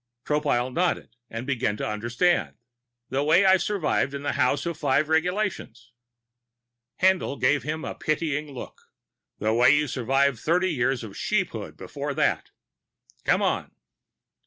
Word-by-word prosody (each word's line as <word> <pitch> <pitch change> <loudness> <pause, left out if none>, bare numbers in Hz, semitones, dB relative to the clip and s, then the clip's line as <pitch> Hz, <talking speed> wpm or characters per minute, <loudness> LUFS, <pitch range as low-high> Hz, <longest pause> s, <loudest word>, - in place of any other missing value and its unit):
Tropile 140 -4 0
nodded, 175 -3 -1 0.3
beginning 125 -6 -1
to - - -3
understand. 120 +11 0 0.5
"The 135 +2 0
way 165 +6 +4
I 190 0 +6
survived 175 -8 0
the 140 +1 -2
House 140 +4 +1
of 170 - -1
the - - -19
Five 145 +1 +1
Regulations." 160 - -1 1.1
Haendl 185 -7 +2
gave 140 +3 +3
him 155 +2 -4
a - - -4
pitying 155 -1 -2
look. 130 - -9 0.6
"The 110 +1 0
way 120 +5 +5
you 150 0 +1
survived 135 0 +1
thirty 180 +7 +1
years 130 -2 0
of 110 - -7
Sheephood - - -2
before - - -5
that. - - 0 0.8
Come - - +3
on." - - -1
145 Hz, 135 wpm, -25 LUFS, 125-165 Hz, 1.1 s, I